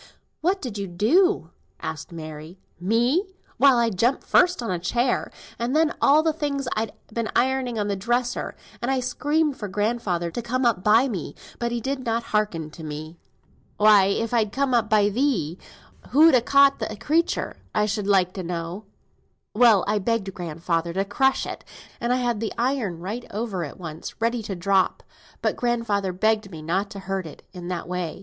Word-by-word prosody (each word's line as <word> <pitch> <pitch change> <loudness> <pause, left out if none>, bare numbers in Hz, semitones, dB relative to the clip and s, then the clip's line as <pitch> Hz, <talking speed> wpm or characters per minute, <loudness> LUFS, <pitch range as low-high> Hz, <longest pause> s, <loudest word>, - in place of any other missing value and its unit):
"What 370 +3 0
did 220 -6 -4
you 200 - -3
do?" 275 - +2 0.3
asked - - -6
Mary. 155 +1 -8 0.2
"Me! 235 - +2 0.3
why, 270 +1 +6
I 235 -1 +2
jumped 235 +7 +1
first 360 -7 +3
on 230 - -2
a 180 - -1
chair, 240 +8 0 0.3
and 240 +4 -1
then 315 0 +3
on - - -10
all 300 +3 +5
the 320 -1 +2
things 280 -3 -2
I'd 220 -1 -2 0.2
been 230 -1 -2
ironing 255 -2 +1
on 205 -1 0
the 200 - 0
dresser, 240 +5 -1 0.3
and 240 - -1
I 270 -1 +2
screamed 295 +3 0
for 210 - -5
grandfather 200 -4 -1
to 240 - -4
come 250 +2 -1
up 220 -6 +2
by 225 +6 +5
me, 180 - -5 0.2
but 235 0 -1
he 240 - -1
did 265 +2 -3
not 230 -1 -1
hearken 175 -8 0
to 160 - -11
me." 155 +2 -7 0.6
"Why, 210 -2 +6
if 225 +4 -1
I'd 220 -3 +2
come 270 +2 0
up 230 -3 +2
by 210 -2 +4
thee, 210 - 0 0.5
who'd 310 +3 +6
ha' 245 -3 +4
caught 280 +1 +5
the 215 - -3
creature, 315 +10 0 0.2
I 210 - +3
should 210 -1 -2
like 185 -3 +3
to 190 - -5
know?" 175 +3 -5 0.7
"Well, 220 -4 +5
I 210 0 +1
begged 200 -1 -1
grandfather 170 0 -2
to 195 +2 0
crush 265 +7 +1
it, - - -7 0.4
and 235 +1 -1
I - - +4
had 240 -3 0
the 225 -1 -3
iron 235 -9 -1
right 215 +7 -5
over 205 -4 -3
it 150 - -7
once, 160 -3 -8
ready 230 +1 0
to 205 -2 -5
drop, 190 +1 +1 0.4
but - - +1
grandfather 230 -5 0
begged 215 +2 +1
me 160 -4 -9
not 190 +5 -1
to 200 - -8
hurt 190 -2 -3
it 155 - -12
in 175 -2 -8
that 180 -2 -4
way. 180 -2 -4
215 Hz, 190 wpm, -24 LUFS, 185-250 Hz, 0.7 s, why